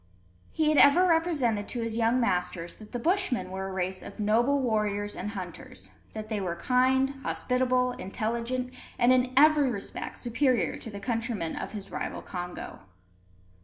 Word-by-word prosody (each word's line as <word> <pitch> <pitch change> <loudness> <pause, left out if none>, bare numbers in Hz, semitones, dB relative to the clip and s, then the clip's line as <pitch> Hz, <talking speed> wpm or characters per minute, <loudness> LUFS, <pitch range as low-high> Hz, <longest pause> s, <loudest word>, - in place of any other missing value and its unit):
He 310 -1 +1
had 305 - +4
ever 315 +6 +7
represented 310 - +1
to 240 - -3
his 230 -1 -2
young 230 +2 +2
masters 180 -6 -1
that 215 -1 -13
the 245 - -3
Bushmen 260 - 0
were 190 0 -4
a - - -5
race 185 0 -2
of 200 - -10
noble 235 +7 +3
warriors 210 -4 0
and 195 - -4
hunters, 175 - -8 0.2
that 215 -1 -6
they 215 -2 -2
were 175 -3 -2
kind, 260 +7 +2
hospitable, 250 -1 +1
intelligent, 235 +4 -3 0.2
and 245 +1 +5
in 255 0 +2
every 300 -1 +6
respect 205 -5 -5
superior 245 +1 +1
to - - -8
the 200 -2 -7
countrymen 230 -6 -2
of - - -5
his 205 -2 -7
rival - - -4
Congo. 180 -1 -6
230 Hz, 165 wpm, -28 LUFS, 200-255 Hz, 0.2 s, ever